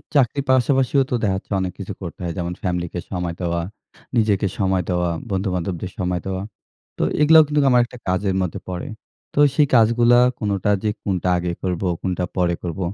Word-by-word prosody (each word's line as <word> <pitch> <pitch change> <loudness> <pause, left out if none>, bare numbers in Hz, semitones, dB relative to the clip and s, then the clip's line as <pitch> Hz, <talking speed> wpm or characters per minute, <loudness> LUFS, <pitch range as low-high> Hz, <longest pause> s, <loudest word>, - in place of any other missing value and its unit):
চাকরির 140 +1 +2
পাশাপাশিও 135 +1 +3
তো 125 - +2
দেখা 95 -2 +2
যাচ্ছে 95 - -12
অনেক 90 -2 -3
কিছু - - -5
করতে - - -7
হয়। 85 - -2
যেমন 90 0 -2
ফ্যামিলিকে 90 -1 -2
সময় 90 -2 -2
দেওয়া, 85 -1 -1 0.6
নিজেকে 105 -3 +2
সময় 95 -1 +1
দেওয়া, 90 -1 +1 0.2
বন্ধুবান্ধবদের 95 -2 -2
সময় 90 -2 -1
দেওয়া। 95 0 -3 0.5
তো - - 0 0.2
এগুলাও 160 +1 +8
কিন্তু 150 0 +1
আমার 125 -1 +5
একটা 125 - -12
কাজের 95 +1 0
মধ্যে 90 -4 -3
পড়ে। 90 -1 -4 0.5
তো - - -1 0.2
সেই 145 -1 +4
কাজগুলা 120 +1 +5 0.2
কোনোটা 100 -1 0
যে 110 - +1
কোনটা 90 -2 -1
আগে 85 0 -2
করব, 90 -2 -1 0.2
কোনটা 90 -1 -2
পরে 85 -1 +2
করব। 85 0 -4
95 Hz, 175 wpm, -21 LUFS, 90-115 Hz, 0.6 s, এগুলাও